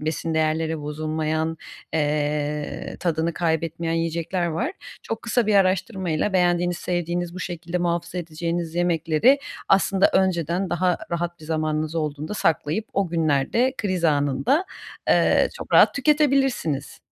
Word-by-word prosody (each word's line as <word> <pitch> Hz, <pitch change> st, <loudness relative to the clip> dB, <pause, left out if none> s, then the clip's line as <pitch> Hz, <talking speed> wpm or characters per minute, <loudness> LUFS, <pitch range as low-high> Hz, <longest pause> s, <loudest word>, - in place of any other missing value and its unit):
besin 160 Hz, +1 st, -2 dB
değerleri 160 Hz, 0 st, 0 dB
bozulmayan, 155 Hz, +2 st, -2 dB, 0.4 s
eee, 150 Hz, -1 st, -1 dB
tadını 165 Hz, -1 st, 0 dB
kaybetmeyen 165 Hz, 0 st, -1 dB
yiyecekler 165 Hz, +2 st, -1 dB
var. 230 Hz, -, -2 dB, 0.3 s
Çok 225 Hz, -, -5 dB
kısa 235 Hz, -1 st, +1 dB
bir 215 Hz, -, +2 dB
araştırmayla 190 Hz, -2 st, +1 dB
beğendiğiniz, 175 Hz, -1 st, +2 dB
sevdiğiniz, 175 Hz, 0 st, -2 dB
bu 185 Hz, -, -6 dB
şekilde 175 Hz, -1 st, -4 dB
muhafaza 170 Hz, 0 st, -2 dB
edeceğiniz 170 Hz, 0 st, -3 dB
yemekleri 175 Hz, -, +3 dB, 0.3 s
aslında 195 Hz, 0 st, +4 dB
önceden 180 Hz, -1 st, +1 dB
daha 180 Hz, 0 st, +1 dB
rahat 175 Hz, 0 st, -3 dB
bir -, -, -11 dB
zamanınız 155 Hz, 0 st, -1 dB
olduğunda 155 Hz, +2 st, -3 dB
saklayıp 165 Hz, +3 st, 0 dB
o 195 Hz, -2 st, 0 dB
günlerde 165 Hz, -, +1 dB
kriz 185 Hz, -5 st, -1 dB
anında, 145 Hz, -, +2 dB, 0.4 s
eee, -, -, +4 dB
çok -, -, -8 dB
rahat -, -, +6 dB
tüketebilirsiniz. 275 Hz, -, +1 dB
170 Hz, 125 wpm, -23 LUFS, 155-185 Hz, 0.4 s, rahat